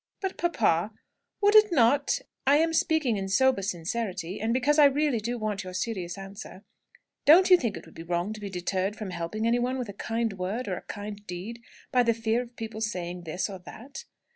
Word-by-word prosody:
"But, 385 Hz, -1 st, -3 dB
papa, 215 Hz, -, +1 dB, 0.5 s
would 410 Hz, +1 st, +4 dB
it 425 Hz, -2 st, +7 dB
not 275 Hz, -1 st, +3 dB, 0.3 s
I 285 Hz, +1 st, +6 dB
am 325 Hz, +1 st, +2 dB
speaking 310 Hz, -9 st, +2 dB
in 195 Hz, 0 st, -3 dB
sober 260 Hz, +2 st, +3 dB
sincerity, 185 Hz, 0 st, -3 dB
and 220 Hz, +1 st, 0 dB
because 280 Hz, +5 st, +2 dB
I 295 Hz, -, +9 dB
really 285 Hz, -3 st, +2 dB
do 240 Hz, +3 st, -3 dB
want 215 Hz, -3 st, -3 dB
your 185 Hz, 0 st, -8 dB
serious 185 Hz, -3 st, -3 dB
answer 195 Hz, 0 st, -9 dB, 0.6 s
don't 365 Hz, +5 st, +7 dB
you -, -, +11 dB
think 235 Hz, -, -2 dB
it -, -, -10 dB
would -, -, -16 dB
be -, -, -9 dB
wrong 175 Hz, +4 st, -2 dB
to 215 Hz, -, -10 dB
be 200 Hz, -, -5 dB
deterred 190 Hz, +2 st, -2 dB
from 210 Hz, -3 st, -6 dB
helping 175 Hz, +6 st, -3 dB
anyone 245 Hz, +2 st, +1 dB
with 245 Hz, -4 st, -4 dB
a -, -, -6 dB
kind 225 Hz, +2 st, -2 dB
word 210 Hz, +7 st, -3 dB
or 185 Hz, -, -1 dB
a -, -, -7 dB
kind 205 Hz, 0 st, -7 dB
deed, 195 Hz, +7 st, -6 dB, 0.3 s
by 250 Hz, -, +4 dB
the 230 Hz, -1 st, +2 dB
fear 225 Hz, +1 st, 0 dB
of 240 Hz, -1 st, -11 dB
people 220 Hz, -1 st, -6 dB
saying 180 Hz, -4 st, -4 dB
this 165 Hz, +3 st, -2 dB
or 195 Hz, -3 st, -8 dB
that?" 265 Hz, -, -10 dB
220 Hz, 210 wpm, -27 LUFS, 190-255 Hz, 0.6 s, you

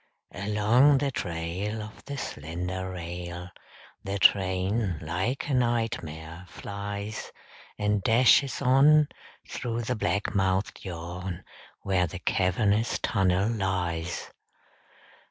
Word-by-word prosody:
Along 105 Hz, +9 st, +4 dB
the 140 Hz, 0 st, 0 dB
trail 90 Hz, +3 st, -3 dB
Of 110 Hz, -, -12 dB
the 140 Hz, 0 st, -5 dB
slender 90 Hz, -, -4 dB
rail 90 Hz, 0 st, -6 dB, 0.5 s
The 100 Hz, +1 st, -2 dB
train, 95 Hz, 0 st, +2 dB
like 90 Hz, -, -2 dB
a 145 Hz, -, -1 dB
nightmare, 95 Hz, -9 st, -1 dB
flies 100 Hz, +3 st, -6 dB, 0.5 s
And 105 Hz, 0 st, +1 dB
dashes 125 Hz, +5 st, +4 dB
on 145 Hz, +4 st, +6 dB, 0.4 s
Through 120 Hz, -1 st, -3 dB
the 125 Hz, +3 st, -1 dB
black 105 Hz, -2 st, -1 dB
mouthed 95 Hz, 0 st, 0 dB
yawn 90 Hz, 0 st, -6 dB, 0.4 s
Where 90 Hz, -2 st, +2 dB
the 95 Hz, -, -7 dB
cavernous 100 Hz, +5 st, +1 dB
tunnel 95 Hz, -1 st, +2 dB
lies. 90 Hz, -5 st, -2 dB
100 Hz, 100 wpm, -27 LUFS, 90-115 Hz, 0.5 s, on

